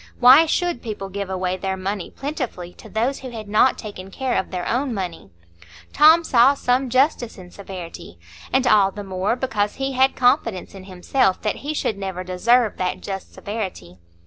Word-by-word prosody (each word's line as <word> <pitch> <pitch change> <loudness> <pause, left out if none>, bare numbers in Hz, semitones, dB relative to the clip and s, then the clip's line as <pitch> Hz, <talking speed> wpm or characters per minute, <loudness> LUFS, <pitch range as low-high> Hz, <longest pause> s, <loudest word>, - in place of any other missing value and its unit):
Why 265 +6 +8
should 350 -5 -1
people 205 -4 -6
give 200 0 -5
away 185 -1 -2
their 190 0 -3
money 190 0 -4
plentifully 255 - -5
to - - -14
those 240 +5 -1
who 260 - -8
had 220 -3 -8
not 215 +5 +3
taken 200 -3 -8
care 260 +5 -2
of - - -1
their 180 -2 -4
own 250 0 -1
money? 180 - -5 0.6
Tom 320 +3 +6
saw 260 -1 +5
some 255 0 0
justice 255 -2 +1
in 180 -1 -12
severity; 180 - -9 0.3
and 265 - +2
all 205 -4 +5
the 205 +1 -8
more, 190 +3 -1
because 215 -6 -1
he 270 0 -2
had 265 +1 +2
confidence 230 -6 +1
in 190 -1 -11
himself 190 +2 0
that 210 - -1
he 300 +2 -4
should 210 -8 -2
never 190 -2 -4
deserve 215 +6 +2
that 185 0 -2
just 195 -1 -6
severity. 190 - -6
210 Hz, 180 wpm, -22 LUFS, 185-255 Hz, 0.6 s, Why